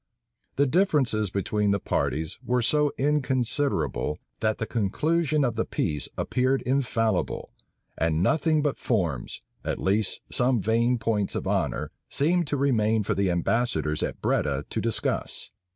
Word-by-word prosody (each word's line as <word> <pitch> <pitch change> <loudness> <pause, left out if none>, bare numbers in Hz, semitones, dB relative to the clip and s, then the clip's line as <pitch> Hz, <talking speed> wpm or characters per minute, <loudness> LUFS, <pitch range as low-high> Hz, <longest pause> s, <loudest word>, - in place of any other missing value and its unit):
The 140 - +3
differences 135 - +2
between 105 +2 0
the 100 0 +2
parties 80 -2 -1
were 125 0 +1
so 150 +3 +3
inconsiderable, 130 - 0 0.2
that 110 -1 +1
the - - -2
conclusion 150 - +1
of 115 -3 -2
peace 75 -4 -1
appeared 130 +1 +1
infallible; 115 -7 0 0.5
and 80 +1 +1
nothing 155 - +2
but 145 -2 -1
forms, 85 - -1 0.2
at - - -2
least 100 +1 +1
some 125 -1 +2
vain 115 +5 +2
points 105 -3 -1
of - - -2
honor, - - -1 0.2
seemed 170 +3 +1
to 145 - -1
remain 110 -5 +2
for - - 0
the 100 -1 +1
ambassadors 85 -3 0
at - - -3
Breda - - 0
to - - -1
discuss. - - -2
115 Hz, 135 wpm, -26 LUFS, 100-140 Hz, 0.5 s, The